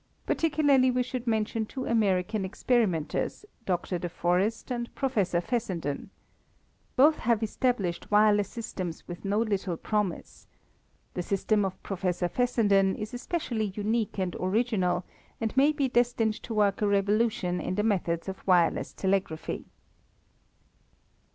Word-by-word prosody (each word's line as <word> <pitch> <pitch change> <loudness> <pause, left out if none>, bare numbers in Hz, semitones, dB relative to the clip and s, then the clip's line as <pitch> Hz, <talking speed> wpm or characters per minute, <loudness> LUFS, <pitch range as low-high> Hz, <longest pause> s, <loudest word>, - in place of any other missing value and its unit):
Particularly 290 -5 +3
we 250 0 +1
should 250 0 -5
mention 220 0 0
two 260 +2 -5
American 210 -2 +1
experimenters, 190 - 0 0.2
Dr. 180 -1 -1
de 175 - -3
Forest 185 +8 0
and 240 -1 -2
Professor 205 -10 +1
Fessenden. 175 - -3 0.9
Both 300 +4 +6
have 230 -1 +1
established 215 -6 -1
wireless 210 -1 +4
systems 185 -7 -6
with 175 -1 -8
no 200 +1 0
little 195 -6 -1
promise. 210 -4 -3 0.7
The 180 - -2
system 200 +3 +1
of 190 -1 -4
Professor 180 -2 -1
Fessenden 205 -3 +2
is 215 +1 -6
especially 240 - -2
unique 215 +1 -1
and 185 -2 -1
original 185 -3 +1 0.3
and 225 0 -2
may 280 +3 +5
be 290 -3 0
destined 240 -3 +2
to 230 - -6
work 205 -1 +2
a 210 - +3
revolution 200 -2 +1
in 185 - -2
the 210 - +1
methods 175 -6 0
of 190 0 -5
wireless 175 -3 +3
telegraphy. 190 -5 -1
210 Hz, 130 wpm, -28 LUFS, 185-235 Hz, 0.9 s, Both